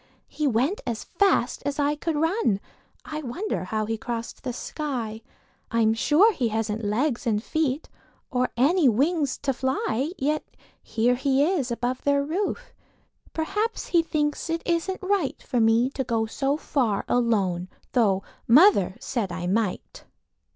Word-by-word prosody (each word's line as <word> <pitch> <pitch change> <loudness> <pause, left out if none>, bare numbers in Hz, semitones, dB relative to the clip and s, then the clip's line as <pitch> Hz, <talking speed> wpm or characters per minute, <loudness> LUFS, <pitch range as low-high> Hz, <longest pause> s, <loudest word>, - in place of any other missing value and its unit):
He 300 -1 -1
went 265 - +1
as 230 -2 -2
fast 395 +3 +1
as 285 0 -2
I 290 0 +1
could 320 +1 -2
run; 320 - +1 0.5
I 305 0 -5
wonder 295 - -3
how 215 +3 -1
he 225 0 -3
crossed 235 0 -5
the 250 - -2
sky? 240 -5 -4 0.5
I'm 225 -2 +3
sure 315 - +4
he 250 -9 0
hasn't 220 0 -2
legs 240 +5 0
and 215 -1 +1
feet 305 0 -1 0.4
Or 250 0 +1
any 295 +3 +4
wings 285 +4 +1
to 275 -1 +1
fly. 260 +2 -1
Yet 300 +3 0 0.4
here 235 +2 +1
he 270 +2 +2
is 315 -8 0
above 245 +2 -2
their 280 0 +2
roof; 400 +9 -3 0.6
Perhaps 420 +8 -2
he 340 -2 +4
thinks 300 0 -1
it 330 0 -1
isn't 350 +3 -1
right 375 -7 0
For 245 - -1
me 230 +3 +3
to 270 - -2
go 230 -3 0
so 275 +5 -1
far 240 -10 0
alone, 195 -7 +1 0.2
Tho' 200 -6 +2 0.2
mother 235 - +6
said 235 -8 -2
I 175 0 -4
might. 200 +1 -2
260 Hz, 150 wpm, -25 LUFS, 225-310 Hz, 0.6 s, mother